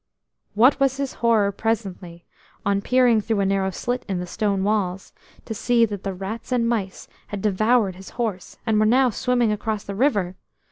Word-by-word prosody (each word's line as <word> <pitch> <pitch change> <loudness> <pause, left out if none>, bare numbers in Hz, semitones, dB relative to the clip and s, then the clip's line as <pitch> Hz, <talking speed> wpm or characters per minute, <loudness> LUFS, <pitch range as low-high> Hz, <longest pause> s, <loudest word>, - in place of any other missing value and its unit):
What 250 +7 +5
was 270 -1 +2
his 275 -1 -3
horror 220 -4 +3
presently, 195 -5 -4 0.4
on 200 0 +1
peering 245 -1 +3
through 220 0 -1
a - - +1
narrow 195 0 +1
slit 245 +6 -3
in 190 - -1
the 180 - -3
stone 195 +1 -1
walls, 195 -3 -1 0.3
to 225 - -4
see 235 +1 +3
that 205 -3 -6
the 195 -2 -4
rats 205 +7 -6
and 240 -2 +2
mice 205 -5 -2 0.2
had 205 - -5
devoured 215 -1 +2
his 190 - -11
horse, 215 -7 -3
and 220 -2 +2
were 215 - +4
now 255 +2 +4
swimming 245 0 +1
across 210 0 -2
the 200 - -6
river. 200 -6 +1
215 Hz, 185 wpm, -23 LUFS, 195-235 Hz, 0.4 s, What